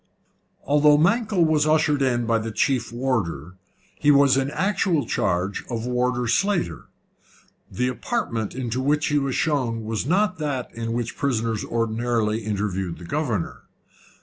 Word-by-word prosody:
Although 150 +1 +4
Mankell 200 +2 +2
was 155 -1 +2
ushered 155 -2 +2
in 120 -3 +1
by 115 0 +2
the 110 +1 -4
chief 125 0 0
warder, 110 - -2 0.5
he 145 - +2
was 140 -2 +6
in 135 0 0
actual 180 - 0
charge 95 -1 -1
of 115 -2 -4
Warder 125 0 0
Slater. 195 - 0 0.8
The 125 +1 -1
apartment 125 - -3
into 125 -1 -2
which 150 +3 +1
he 145 0 +2
was 135 -2 -2
shown 125 -7 0
was 110 +3 -2
not 185 +2 +1
that 140 -5 -3
in 115 0 -4
which 120 0 -3
prisoners 115 -5 -1
ordinarily 115 -1 0
interviewed 100 -4 -3
the 85 - -10
governor. 120 - -2
125 Hz, 145 wpm, -23 LUFS, 115-150 Hz, 0.8 s, was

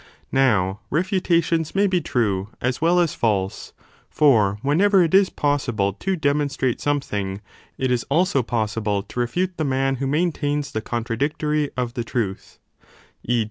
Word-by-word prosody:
Now 105 -8 +2
refutations 170 -2 0
may 200 +1 +3
be 185 -3 +1
true 105 -8 -1
as 125 +2 -2
well 170 +2 +3
as 170 -3 +1
false: 100 -4 -1 0.4
for 110 -9 +3
whenever 185 +7 +4
it 165 - -1
is 195 0 +5
possible 120 -9 0
to 190 - -2
demonstrate 140 -5 0
something, 105 -10 -2 0.4
it 130 -1 0
is 125 -2 +1
also 160 -1 +2
possible 110 -3 -1
to 125 - -7
refute 175 +10 -1
the 160 - -1
man 135 -1 0
who 135 +1 -2
maintains 150 -2 -1
the 110 - -3
contradictory 140 +6 -1
of 125 -2 -2
the 120 -2 -3
truth; 110 -4 -4 0.7
e. 120 -1 +3
135 Hz, 145 wpm, -22 LUFS, 115-160 Hz, 0.7 s, is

